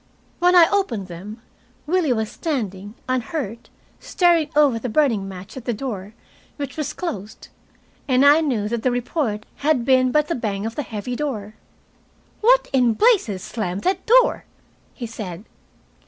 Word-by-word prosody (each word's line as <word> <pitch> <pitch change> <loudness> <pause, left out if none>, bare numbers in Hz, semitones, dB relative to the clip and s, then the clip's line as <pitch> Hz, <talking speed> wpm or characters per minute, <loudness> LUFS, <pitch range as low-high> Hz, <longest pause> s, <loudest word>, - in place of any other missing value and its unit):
When 360 +1 +4
I 340 -2 +8
opened 235 - -1
them, 205 +7 -9 0.4
Willie 330 -2 +1
was 220 -3 -1
standing 210 - -4
unhurt, 250 -2 -3 0.3
staring 340 -4 +2
over 285 -6 +4
the 250 - -4
burning 225 -7 +1
match 190 +1 -9
at 255 -2 -8
the 240 - -1
door, 210 -4 -6 0.4
which 280 -3 -6
was 300 -2 -3
closed, 220 - -6 0.6
and 260 0 +4
I 295 +3 +7
knew 240 -9 0
that 235 +1 -2
the 255 - +2
report 245 -3 -2
had 285 -5 +1
been 255 -1 +4
but 300 +2 +2
the 335 - -1
bang 210 -5 -3
of 225 - -3
the 295 - -3
heavy 225 0 -5
door. 225 -8 -4 0.9
"What - - +4
in 245 -4 +3
blazes 370 - +2
slammed 200 -5 -4
that 375 +2 -1
door?" - - +4 0.5
he 245 - -5
said. 205 -5 -7
250 Hz, 155 wpm, -22 LUFS, 210-300 Hz, 0.9 s, I